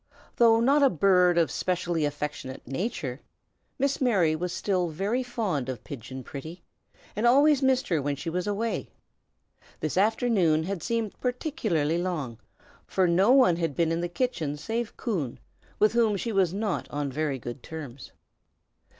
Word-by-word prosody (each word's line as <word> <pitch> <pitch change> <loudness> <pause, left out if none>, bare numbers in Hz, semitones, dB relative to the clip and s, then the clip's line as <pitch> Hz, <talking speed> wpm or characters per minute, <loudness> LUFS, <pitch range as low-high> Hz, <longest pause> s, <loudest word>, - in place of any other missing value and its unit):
Though 225 -1 +6
not 275 +5 +4
a 275 - +6
bird 180 - +4
of 165 -2 +3
specially 175 -3 -1
affectionate 145 -2 -5
nature, 140 - -4 0.6
Miss 275 +1 0
Mary 190 -11 +3
was 175 +2 -3
still 185 -1 0
very 200 +10 -1
fond 210 - -2
of 125 -4 -5
Pigeon 130 -1 -8
Pretty, 155 +7 -8 0.5
and 220 +3 +2
always 285 +3 +5
missed 265 0 +2
her 165 -5 +1
when 140 +1 -1
she 140 +5 -8
was 180 +3 -2
away. 215 +3 -2 0.9
This 155 +3 -3
afternoon 200 -7 +2
had 190 0 -4
seemed 230 +2 -2
particularly 225 - -1
long, 155 -11 -3 0.5
for 185 -1 +2
no 185 +5 +3
one 255 -11 +5
had 165 -5 -2
been 165 -1 +1
in 165 +1 0
the 175 - -2
kitchen 175 - -2
save 230 +8 -4
Coon, 170 - -2 0.4
with 215 +1 +3
whom 225 -3 +3
she 230 +4 -3
was 190 -5 +2
not 205 0 -2
on 145 -1 -3
very 145 0 -1
good 120 +1 -7
terms. 140 -5 -9
180 Hz, 160 wpm, -27 LUFS, 155-225 Hz, 0.9 s, Though